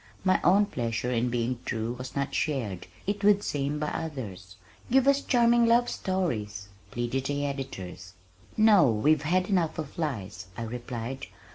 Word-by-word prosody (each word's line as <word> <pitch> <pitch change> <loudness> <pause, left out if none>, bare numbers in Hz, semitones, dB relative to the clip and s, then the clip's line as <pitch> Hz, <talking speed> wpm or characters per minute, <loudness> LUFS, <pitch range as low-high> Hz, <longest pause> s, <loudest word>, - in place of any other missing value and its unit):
My 185 -1 +3
own 200 +4 +5
pleasure 120 - -2
in 120 0 +1
being 120 +1 -1
true 115 +1 -2
was 125 +1 -8
not 140 0 -1
shared, 120 - -2 0.2
it 205 +1 -2
would 205 0 +5
seem, 145 +1 -1
by 150 0 -1
others. 105 - -6 0.3
"Give 265 +2 +4
us 280 0 +4
charming 235 -2 +4
love 240 +1 +4
stories!" 110 - -2 0.2
pleaded 120 +4 -2
the 145 0 -1
editors. 95 -10 -6 0.4
"No, 210 - +6
we've 140 +8 +3
had 180 +5 +1
enough 175 -6 +1
of 155 0 -6
lies," 105 - -4
I 115 - -3
replied. 120 +2 -5
140 Hz, 155 wpm, -28 LUFS, 115-185 Hz, 0.4 s, No